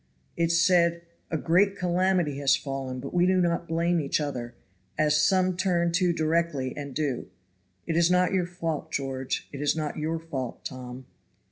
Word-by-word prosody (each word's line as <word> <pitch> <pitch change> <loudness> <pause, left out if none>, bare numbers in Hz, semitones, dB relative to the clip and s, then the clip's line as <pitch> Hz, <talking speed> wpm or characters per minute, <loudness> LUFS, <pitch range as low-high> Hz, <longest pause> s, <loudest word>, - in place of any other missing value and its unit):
It 170 0 +1
said: 170 0 +3 0.3
"A 160 - -1
great 190 +6 +3
calamity 180 -5 +1
has 140 0 +4
fallen; 135 -3 -4
but - - -7
we 175 0 +3
do 185 0 +3
not 170 -1 0
blame 170 +1 +1
each 140 - 0
other, 125 -5 -4 0.4
as 150 0 +3
some 185 +2 +3
turn 175 -2 +1
to 180 0 +2
directly 160 -5 0
and 140 -3 -7
do. 140 -9 -2 0.6
It 165 - -2
is 170 0 +4
not 180 +1 +3
your 180 -2 +1
fault, 165 -4 -4
George. 135 -1 -3
It 140 - -6
is 145 +1 +2
not 155 -1 -3
your 160 +2 -1
fault, 140 -7 -6
Tom." 130 0 -7
165 Hz, 170 wpm, -27 LUFS, 140-175 Hz, 0.6 s, has